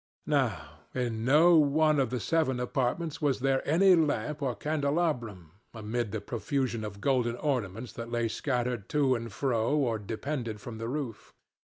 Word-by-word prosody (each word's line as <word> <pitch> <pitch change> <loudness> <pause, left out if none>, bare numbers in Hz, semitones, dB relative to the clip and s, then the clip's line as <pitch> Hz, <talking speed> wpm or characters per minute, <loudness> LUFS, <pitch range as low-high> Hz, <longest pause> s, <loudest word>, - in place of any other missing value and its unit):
Now - - -1 0.2
in 120 -3 -2
no 160 +7 +6
one 155 +1 +3
of 130 - +1
the 125 +1 -2
seven 130 - +1
apartments 135 +6 -1
was 145 -3 +1
there 135 0 +1
any 185 +5 +6
lamp 150 -2 0
or 130 -4 -1
candelabrum, 140 - -1 0.2
amid 110 0 -3
the 110 - -2
profusion 120 0 -2
of 100 -1 -7
golden 125 -2 +1
ornaments 120 -5 -2
that 115 0 -7
lay 120 -1 0
scattered 125 -3 -2
to 140 -3 +2
and 115 -2 -4
fro 120 +4 0
or 120 -6 +1
depended 115 +1 -4
from 110 +1 -8
the 115 - -4
roof. 130 -5 -5
125 Hz, 160 wpm, -29 LUFS, 115-145 Hz, 0.2 s, no